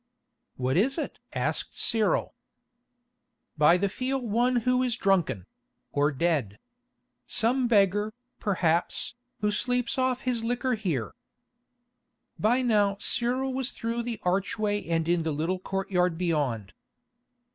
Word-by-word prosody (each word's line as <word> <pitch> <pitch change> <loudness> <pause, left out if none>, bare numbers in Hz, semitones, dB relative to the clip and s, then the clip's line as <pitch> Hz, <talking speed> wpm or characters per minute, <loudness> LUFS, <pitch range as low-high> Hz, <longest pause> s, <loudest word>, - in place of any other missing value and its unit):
"What 130 +2 0
is 260 +8 +2
it?" 320 - -4
asked - - -2
Cyril. 220 -2 +1 1.2
"By 155 +3 +5
the 200 +2 +1
feel 255 +7 -2
one 240 +1 +1
who 250 0 +3
is 250 -2 0
drunken—or 155 - -1
dead. 140 - 0 0.7
Some 245 +3 +2
beggar, 205 -1 +3 0.3
perhaps, 175 -4 0 0.3
who 210 0 +2
sleeps 250 +4 0
off 255 -1 +1
his 245 -3 -1
liquor 245 +2 0
here." 170 - -2 1.3
By 245 +5 +3
now 205 -4 +2
Cyril 250 +5 0
was 260 0 -1
through 230 -1 -3
the 235 -2 -4
archway 205 +3 0
and 165 -1 0
in 175 0 +2
the 160 0 -1
little 165 +5 -1
courtyard 185 -3 0
beyond. 145 - -1
205 Hz, 120 wpm, -27 LUFS, 170-245 Hz, 1.3 s, By